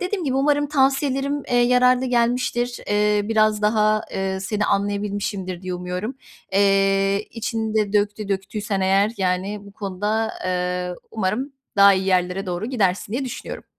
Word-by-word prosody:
dediğim 365 -1 -2
gibi, 265 -2 -1
umarım 290 +1 +2
tavsiyelerim, 275 0 +1
eee, 245 - +1
yararlı 250 +1 +4
gelmiştir. 240 0 0
Eee, 210 0 +2
biraz 215 -1 +2
daha, 215 0 +3
eee, 190 0 -2
seni 210 +2 -1
anlayabilmişimdir 200 -2 -2
diye 185 -1 -4
umuyorum. 180 +7 -4 0.4
Eee, 195 0 +2
içini 225 -1 -3
de 210 -2 +1
döktü 205 0 0
döktüysen 195 +1 -2
eğer, 195 +3 +3
yani, 190 +2 -1
bu 200 - -13
konuda, 210 +3 -2
eee, 180 0 -1 0.2
umarım 225 +7 -2 0.2
daha 200 0 +7
iyi 190 0 -1
yerlere 185 +1 +1
doğru 180 +4 -3
gidersin 200 -5 0
diye 265 +3 -1
düşünüyorum. 250 - -7
210 Hz, 145 wpm, -22 LUFS, 195-240 Hz, 0.4 s, daha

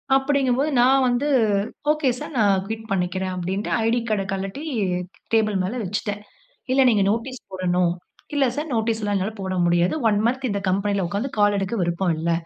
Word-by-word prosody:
அப்டிங்கும்போது 270 0 +2
நான் 265 +2 +5
வந்து, 245 +4 +1 0.6
"ஓகே 305 -3 +1
சார், - - -7
நான் 200 -3 +3
குயிட் 220 +1 -6
பண்ணிக்கிறேன்" 185 0 -1
அப்டினுட்டு 185 +3 -3
ஐடி 235 +2 +2
கார்ட 210 -2 +1
கழட்டி 195 +9 -4 0.7
டேபிள் 215 -2 +3
மேல 190 +5 -2
வைச்சிட்டேன். 205 +1 -3 0.5
"இல்ல 270 - +4
நீங்க 215 -4 +3
நோட்டீஸ் 240 +4 -3
போடணும். 180 -2 +1 0.4
இல்ல 285 -1 +3
சார் 300 +2 -3
நோட்டீஸ் 225 0 0
எல்லாம் 205 -1 0
என்னால 195 +3 -1
போட 190 -1 -3
முடியாது. 175 +1 +2
1 205 -1 +2
மந்த் 260 +2 0
இந்த 200 0 -1
கம்பெனியில 200 +1 0
உட்கார்ந்து 205 +9 -3
கால் 205 0 +4
எடுக்க 195 +3 -2
விருப்பம் 175 0 0
இல்ல. 165 +2 -1
205 Hz, 170 wpm, -23 LUFS, 190-245 Hz, 0.7 s, நான்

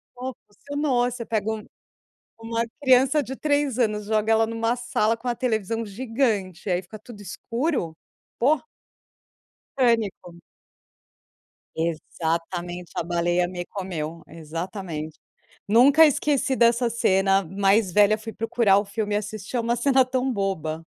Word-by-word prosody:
Pô, 255 0 -5
funcionou. 265 +1 -1
Você 235 -1 -6
pega 220 -1 -1
um 220 -1 -5 0.7
uma 230 +1 -2 0.2
criança 265 +3 +4
de 265 +1 -6
3 285 -3 0
anos, 210 -3 +1
joga 215 +1 0
ela 225 0 +4
numa 230 +1 -1
sala 230 -2 0
com 250 - -13
uma 240 - +1
televisão 225 -2 -1
gigante, 210 -5 -2
aí 180 0 +1
fica 215 +4 -11
tudo 210 -1 -12
escuro. 230 - -3 0.4
Pô. 275 +4 +3 1.2
Pânico. 225 -8 +1 1.4
Exatamente, 170 +2 -3
"a - - -1
baleia 175 +1 +1
me 175 -1 -5
comeu", 170 -4 -5
exatamente. 165 0 -6 0.5
Nunca 275 +9 +7
esqueci 285 -2 +1
dessa 235 0 +3
cena. 195 -3 +2
Mais 195 0 +2
velha, 210 +2 +5
fui 220 +1 -8
procurar 225 -3 +2
o 205 - -3
filme 205 0 -2
e - - +3
assistir. 210 +2 -6
É - - +1
uma 235 +1 0
cena 265 +2 +4
tão 255 +1 -1
boba. 165 -6 -2
220 Hz, 135 wpm, -24 LUFS, 185-245 Hz, 1.4 s, Nunca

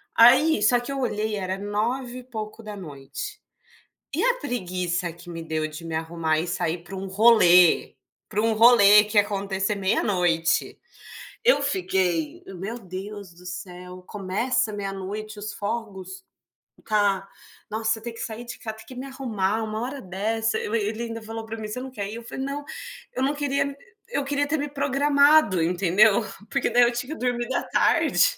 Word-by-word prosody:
Aí 260 +4 +6
só 245 +3 +5
que 245 +3 -6
eu 275 - -3
olhei 215 -3 -1
era 190 -1 -3
nove 235 +5 -2
e 250 - -11
pouco 220 -2 -7
da 210 -1 -7
noite. 170 - -7 0.8
E - - 0
a - - +4
preguiça 180 - -2
que 170 +1 -12
me 165 -1 -6
deu 155 -1 -2
de 155 +2 -9
me 165 - -5
arrumar 160 -1 -1
e 170 - -3
sair 170 -1 -2
pra 190 - -9
um 190 +1 -5
rolê, 190 -4 +5 0.3
pra 210 +2 -1
um 225 0 +2
rolê 210 -2 +7
que 210 0 -6
ia - - +8
acontecer 200 0 -1
meia-noite. 180 -4 +1 0.7
Eu - - +5
fiquei: 180 - 0
"Meu 195 +4 -6
Deus 195 -1 -8
do 180 +1 -15
céu, 180 0 -8
começa 215 +5 -1
meia-noite 205 +2 -5
os 210 +1 -5
fogos?". 195 -4 -5 0.6
Tá. 200 -3 +1 0.4
Nossa, 220 +1 0
ter 235 +1 -5
que 230 - -11
sair 225 +1 -5
de 240 - -8
ca 220 -3 -5
ter 220 - -14
que 255 - -11
me 255 - -6
arrumar, 225 -6 -1
uma 215 +1 -3
hora 270 +3 -4
dessa? 220 +4 -1
Eu 215 - -2
e - - +3
ele 225 +2 -4
ainda, 230 -1 -5
falou 225 0 -6
pra 225 0 -6
mim: 215 -1 -5
"Você 215 - -4
não 265 - -6
quer 200 -5 -4
ir?" - - -6
Eu 235 - -8
falei: 265 +3 -5
"Não, 285 +1 -4 0.5
eu 260 - 0
não 280 - +2
queria 280 -1 -1 0.3
eu 285 - -1
queria 285 +1 0
ter 315 +2 0
me 290 - -2
programado", 280 - +4
entendeu. 190 +5 +4 0.3
Porque - - +1
daí 245 +1 +5
eu 240 - +4
tinha 250 +6 -4
dormido 245 -2 -2
à - - 0
tarde. - - +3
215 Hz, 180 wpm, -25 LUFS, 190-245 Hz, 0.8 s, ia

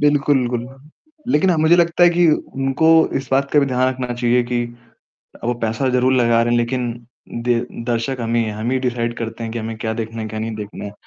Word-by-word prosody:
बिल्कुल, 145 -1 +3
बिल्कुल। 120 -1 -2 0.7
लेकिन 185 +5 +3
अ, 170 - +2
मुझे 160 +3 +4
लगता 170 0 +2
है 175 - +6
कि 175 0 +3
उनको 135 +1 0 0.3
इस 135 - -13
बात 140 +1 +2
का 150 - +3
भी 140 - +3
ध्यान 130 -1 +1
रखना 130 -1 -3
चाहिए 120 0 +2
कि 120 -1 0 0.8
वो 120 +1 0
पैसा 115 +4 -1
ज़रूर 125 +1 +2
लगा 115 -2 +3
रहे 120 0 0
हैं 120 - +3
लेकिन 120 0 -1 0.5
दे 120 -1 +2 0.3
दर्शक 120 +2 -1
हम 115 0 -2
ही 115 - +3
हैं। 110 - -3
हम 110 +3 -3
ही 130 - +1
डिसाइड 120 -1 -2
करते 115 0 -5
हैं 115 - -5
कि 120 - -3
हमें 110 0 -5
क्या 110 0 -2
देखना 115 0 -5
है, 110 - -5
क्या 110 0 -6
नहीं 110 0 -3
देखना 105 -1 -7
है 100 - -6
120 Hz, 235 wpm, -19 LUFS, 115-135 Hz, 0.8 s, है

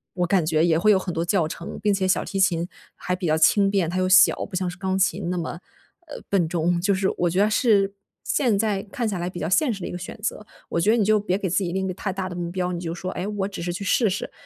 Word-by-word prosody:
我 180 -1 0
感 180 -3 +2
觉 160 0 +2
也 165 -2 +3
会 215 +4 +4
有 200 - +5
很 185 -2 -5
多 165 +1 -1
教 175 -2 +1
程。 170 +1 -7
并 205 0 +2
且 190 -1 0
小 185 - +1
提 195 - -4
琴 175 -3 +2 0.3
还 180 - -3
比 180 -1 -3
较 155 0 +2
轻 195 +5 +4
便， 190 -5 +1
它 180 - -3
又 185 - +1
小， 185 -1 +5
不 - - -9
像 185 0 -1
是 175 - -9
钢 190 0 -1
琴 195 -1 0
那 180 - -2
么， 170 0 -4 0.5
呃， 295 - -9
笨 185 -5 +2
重。 170 0 0
就 200 +3 +2
是 190 0 +1
我 175 - +1
觉 180 +3 -1
得 210 - +3
是 205 -4 +2 0.3
现 240 -7 +1
在 205 -2 0
看 235 +3 -3
下 200 -3 -2
来 175 +1 -2
比 180 - -9
较 165 - -2
现 255 +8 +3
实 195 - -8
的 - - -4
一 - - -6
个 - - -5
选 180 +5 -8
择， 215 -2 -3 0.2
我 - - -1
觉 170 - +2
得 235 - +3
你 220 - +3
就 215 +1 +3
别 195 -2 -1
给 190 -3 -3
自 - - 0
己 175 - -2
定 190 - -1
一 - - -2
个 185 - -3
太 190 +1 -4
大 190 -1 -4
的 175 - -7
目 170 -1 -4
标， 180 0 -2
你 175 - -3
就 170 -1 -4
说 185 +1 -5
诶 185 - -4
我 205 -2 -2
只 195 -4 -7
是 175 0 -3
去 200 - -5
试 220 +2 +2
试， 190 - -4
185 Hz, 330 characters per minute, -23 LUFS, 175-200 Hz, 0.5 s, 有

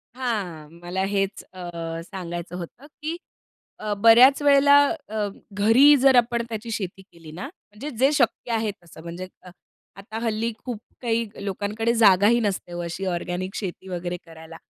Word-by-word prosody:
हां. 200 -12 -3
मला 180 +2 -2
हेच 195 0 -1
अ, 170 -2 -6
सांगायचं 175 -1 -7
होतं 180 - -9 0.2
की 320 +3 -3 0.6
अ, 210 -1 -2
बऱ्याच 235 +7 +7
वेळेला 285 0 +6 0.3
अ, 215 -1 -1 0.3
घरी 230 +9 +6
जर 265 0 +5
आपण 235 -1 +3
त्याची 225 +1 -5
शेती 195 -3 -4
केली 165 -4 -15
ना 180 - -7
म्हणजे 275 - -10
जे 270 +2 +5
शक्य 240 -2 0
आहे 220 -1 0
तसं 165 -1 -14
म्हणजे 175 +2 -7
अ, 180 - -13 0.5
आता 205 +3 -8
हल्ली 225 0 -1
खूप 245 -4 -4 0.2
काही 230 -2 0 0.2
लोकांकडे 210 +4 -1
जागाही 215 0 +5
नसते 200 -5 -2
हो 175 - -4
अशी 170 +3 -5
ऑर्गेनिक 180 +1 -3
शेती 190 -2 -5
वगैरे 175 0 -4
करायला. 165 0 -12
205 Hz, 155 wpm, -24 LUFS, 180-235 Hz, 0.6 s, बऱ्याच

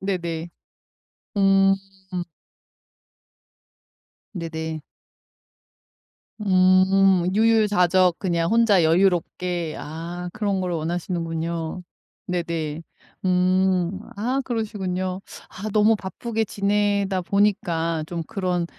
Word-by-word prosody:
네네. 170 -4 -3 0.9
음. 195 -1 +5 2.6
네네. 160 -3 -4 1.7
음 185 0 +4
유유자적 200 -5 +3
그냥 170 -1 0
혼자 225 -6 +4
여유롭게 175 -1 +1
아 170 +3 -6
그런 205 -3 -1
걸 180 -1 -2
원하시는군요. 165 0 -3 0.5
네네. 165 -3 -3 0.4
음 185 0 +2 0.2
아 250 +7 -1
그러시군요. 190 -5 -3 0.3
아 215 +3 -6
너무 215 +1 +5
바쁘게 220 +3 -3
지내다 200 -1 0
보니까 170 -4 0
좀 170 0 -4
그런 180 -3 -1
185 Hz, 165 characters per minute, -23 LUFS, 170-200 Hz, 2.6 s, 음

